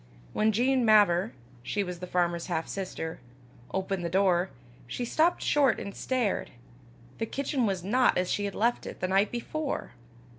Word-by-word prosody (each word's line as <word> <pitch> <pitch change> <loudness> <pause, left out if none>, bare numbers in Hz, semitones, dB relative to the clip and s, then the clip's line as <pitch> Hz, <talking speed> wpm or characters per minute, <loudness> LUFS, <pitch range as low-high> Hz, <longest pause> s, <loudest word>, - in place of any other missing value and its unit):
When 215 +1 +3
Jean 250 +4 +2
Mavor 205 - +5 0.3
she 205 +11 -1
was 180 -2 -6
the 180 - -6
farmer's 175 -1 0
half 165 -3 -2
sister 180 -4 -5 0.5
opened 190 -1 -2
the 170 - -1
door, 185 0 +2 0.4
she 245 - -3
stopped 320 +8 +2
short 280 -5 +3
and 200 - -6
stared; 250 -6 -1 0.7
the 225 - -1
kitchen 275 -2 -1
was 190 -3 -2
not 245 +6 +3
as 180 0 +1
she 205 - 0
had 200 - -4
left 235 +3 +1
it - - -8
the 185 - -1
night 195 +2 +3
before! 280 +5 -3
200 Hz, 170 wpm, -28 LUFS, 180-240 Hz, 0.7 s, Mavor